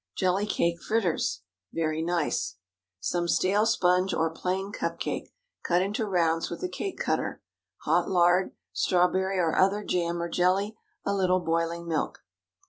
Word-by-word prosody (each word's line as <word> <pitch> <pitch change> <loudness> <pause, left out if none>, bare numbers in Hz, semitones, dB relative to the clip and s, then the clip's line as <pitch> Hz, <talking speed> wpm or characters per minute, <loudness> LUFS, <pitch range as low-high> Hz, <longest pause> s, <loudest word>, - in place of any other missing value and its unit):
JELLY 190 +3 +1
CAKE 170 -4 0
FRITTERS 185 - 0 0.3
(very 160 -1 -1
nice). 170 -2 0
✠ - - -33 0.5
Some 175 - 0
stale 200 +5 +3
sponge, 185 -3 +2
or 165 0 +1
plain 190 +4 -2
cup - - -3
cake, - - -3 0.3
cut 175 +1 +2
into 210 +3 -2
rounds 165 -4 +1
with - - -6
a - - +1
cake 390 - -4
cutter. - - -1 0.4
Hot - - +2
lard. 180 0 +3 0.2
Strawberry 185 +2 +2
or 165 -3 +1
other 195 +2 +3
jam, 170 -2 -1
or 170 - -1
jelly. 190 +5 +1 0.3
A 200 - +1
little 185 -2 +2
boiling 165 0 -1
milk. 160 -3 -2
180 Hz, 150 wpm, -27 LUFS, 170-195 Hz, 0.5 s, stale